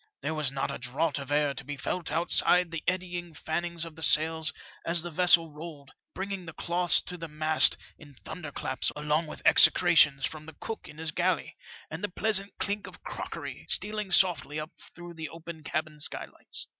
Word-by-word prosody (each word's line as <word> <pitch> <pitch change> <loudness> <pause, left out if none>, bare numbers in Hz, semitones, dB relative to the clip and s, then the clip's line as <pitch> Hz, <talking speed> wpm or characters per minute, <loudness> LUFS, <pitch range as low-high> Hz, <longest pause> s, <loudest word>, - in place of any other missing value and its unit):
There 150 +3 -1
was 150 -4 -1
not 135 0 -2
a - - -6
draught 140 +5 -1
of 140 0 -7
air 145 -1 +2
to - - -6
be 145 +1 -6
felt 165 +5 -3
outside 175 +1 +3
the 165 -2 -4
eddying 175 -2 -2
fannings 170 +2 -3
of 165 -2 -10
the 160 - -12
sails 160 +1 +2 0.3
as 170 0 +1
the 175 - -5
vessel 165 -1 +5
rolled, 150 -2 -10 0.2
bring 195 +1 -4
ing 185 -3 -5
the 165 - -7
cloths 175 +1 +2
to 180 -1 -8
the 165 - -5
mast 155 +1 +4 0.2
in 145 -3 -14
thunderclaps 145 -2 -3
along 150 +2 0
with - - -9
execrations 155 -6 +6
from 155 -1 -6
the 160 - -10
cook 225 - -6
in 150 - -12
his 160 -1 -2
galley, - - 0 0.4
and 160 +4 -6
a 205 - 0
pleasant 200 +1 +3
elink 205 0 -3
of - - -12
crockery - - -6
stealing 210 -1 0
softly 175 -5 +3
up 155 +1 -6 0.2
through 175 0 -9
the 160 -2 -6
open 165 0 -9
cabin 155 0 -3
skylights. 145 - -5
160 Hz, 190 wpm, -29 LUFS, 150-175 Hz, 0.4 s, execrations